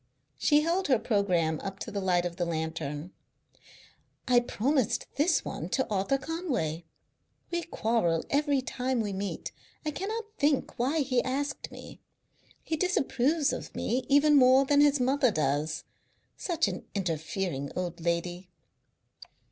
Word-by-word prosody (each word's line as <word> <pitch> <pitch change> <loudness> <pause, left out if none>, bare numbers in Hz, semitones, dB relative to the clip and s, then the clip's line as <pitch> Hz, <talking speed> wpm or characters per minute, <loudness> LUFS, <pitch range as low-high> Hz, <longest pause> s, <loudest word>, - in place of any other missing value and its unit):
She 295 -1 +4
held 345 +4 0
her 260 -3 +4
programme 180 -8 +1
up 195 -1 -6
to - - -5
the 200 - -2
light 180 -2 +2
of 175 0 -4
the 175 - 0
lantern. 160 0 -3 1.2
"I 250 -1 +6
promised 250 +1 0
this 295 +1 +2
one 165 - -5
to 265 +7 0
Arthur 200 +7 +1
Conway. 260 - -3 0.7
We 345 0 0
quarrel 220 - 0
every 285 -2 +2
time 255 -1 -1
we 205 -2 -2
meet. 195 +1 -4 0.3
I 305 - 0
cannot 430 +9 -3 0.2
think 285 -4 +1
why 280 +6 +1
he 255 -3 +1
asked 280 +3 -3
me; - - -11 0.6
he 320 - -1
disapproves 295 -4 +1
of - - -6
me 250 +3 -1
even 290 +2 +5
more 260 +1 +6
than 285 +1 +4
his 290 -1 +4
mother 260 +1 +3
does 155 -2 -1 0.5
such 335 -3 0
an - - -4
interfering 165 -4 -2
old 175 -2 -3
lady. 175 +2 -2
245 Hz, 140 wpm, -29 LUFS, 175-285 Hz, 1.2 s, I